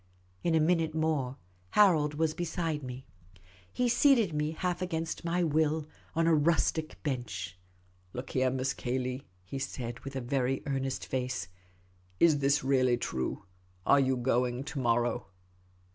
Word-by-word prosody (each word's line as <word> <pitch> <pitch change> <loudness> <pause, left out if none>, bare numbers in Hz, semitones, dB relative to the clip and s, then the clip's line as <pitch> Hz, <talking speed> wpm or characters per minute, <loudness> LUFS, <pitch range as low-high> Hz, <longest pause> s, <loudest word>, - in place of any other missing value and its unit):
In 170 -1 +2
a - - +5
minute 160 -1 +2
more, 150 -5 0 0.3
Harold 160 - +4
Til - - -8
lington - - -7
was 160 -1 +2
beside 165 -2 -2
me. 130 0 -7 0.7
He 250 - +1
seated 240 - +4
me, 150 0 0
half 180 +1 -2
against 165 -3 -3
my 170 +1 +1
will, 155 -1 +1 0.3
on 165 0 +2
a 165 - +4
rustic 160 0 +2
bench. 105 - -3 0.3
" 90 0 -34
Look 125 +1 -6
here. 130 0 +2
Miss 130 +1 -1
Cayley," 130 +1 -3 0.2
he 100 +9 -5
said, 120 -3 -4
with 135 0 -8
a 130 - -2
very 130 +1 0
earnest 135 -2 -2
face; 125 -6 -2 0.3
" 90 0 -34
is 155 -4 +5
this 140 0 +2
really 130 -2 +3
true? 65 - -3 0.4
Are 140 - +6
you 130 -1 +2
going 125 0 +1
to 145 0 -5
morrow 120 -3 +1
135 Hz, 160 wpm, -30 LUFS, 125-160 Hz, 0.7 s, Are